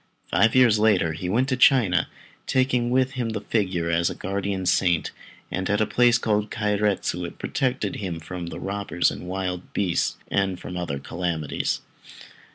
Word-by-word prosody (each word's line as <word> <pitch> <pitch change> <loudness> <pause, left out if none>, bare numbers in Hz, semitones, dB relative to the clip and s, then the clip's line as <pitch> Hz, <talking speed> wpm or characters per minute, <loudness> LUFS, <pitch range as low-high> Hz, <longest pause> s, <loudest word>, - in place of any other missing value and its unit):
Five 115 +3 +3
years 120 -5 +5
later 100 -7 +3
he 90 +3 -4
went 125 +7 +2
to 130 - +1
China, 120 -9 +4 0.4
taking 125 -2 +1
with 130 +1 +2
him 125 -3 -2
the 110 -1 -3
figure 95 -7 -1
as 85 +1 +2
his - - -3
guardian 95 0 -2
saint, 90 -2 +2 0.4
and 95 - -2
at 105 - +2
a 110 - +3
place 120 +2 +4
called 105 -3 0
Kairetsu 105 -4 0
it 85 - -7
protected 125 -6 -1
him 90 -5 -4
from 85 +1 -6
robbers 100 -1 -1
and 90 - -8
wild 90 -1 -4
beasts 90 -4 0
and 95 -2 0
from 90 - -7
other 85 -6 -3
calamities. 80 0 -2
100 Hz, 165 wpm, -24 LUFS, 90-110 Hz, 0.4 s, years